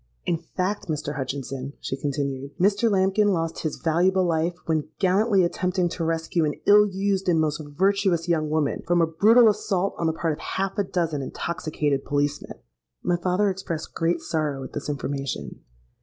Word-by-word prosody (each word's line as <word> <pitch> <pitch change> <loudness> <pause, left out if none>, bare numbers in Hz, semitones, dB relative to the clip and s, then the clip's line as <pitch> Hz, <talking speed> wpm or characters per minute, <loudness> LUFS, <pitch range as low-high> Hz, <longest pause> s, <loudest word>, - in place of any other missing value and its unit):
'In 170 - +1
fact, 185 +5 -3
Mr. 150 -2 -3
Hutchinson,' 135 0 -4
she - - -3
continued, 140 0 -3
'Mr. 205 +5 +3
Lambkin 195 +1 +3
lost 165 -5 0
his 155 - -2
valuable 180 +3 +2
life 170 +1 0
when 160 -2 0
gallantly 195 +1 +3
attempting 180 +1 0
to 170 - -4
rescue 165 +1 0
an 150 -1 0
ill 210 0 +7
used 195 -1 -1
and 165 -2 +3
most 155 -1 0
virtuous 180 +2 +1
young 155 -3 +1
woman 155 -2 0
from 175 0 +3
a 165 - +5
brutal 220 +9 +5
assault 200 -2 +1
on 165 - +1
the 160 - +1
part 160 0 -1
of - - -8
half 195 0 -2
a - - +3
dozen 165 -6 -1
intoxicated 150 -1 -2
policemen.'—My 145 - -3
father 180 +4 +1
expressed 170 -4 -5
great 170 0 0
sorrow 150 -5 -2
at - - -9
this 150 - -4
information. 140 -2 -4
165 Hz, 170 wpm, -25 LUFS, 150-190 Hz, -, ill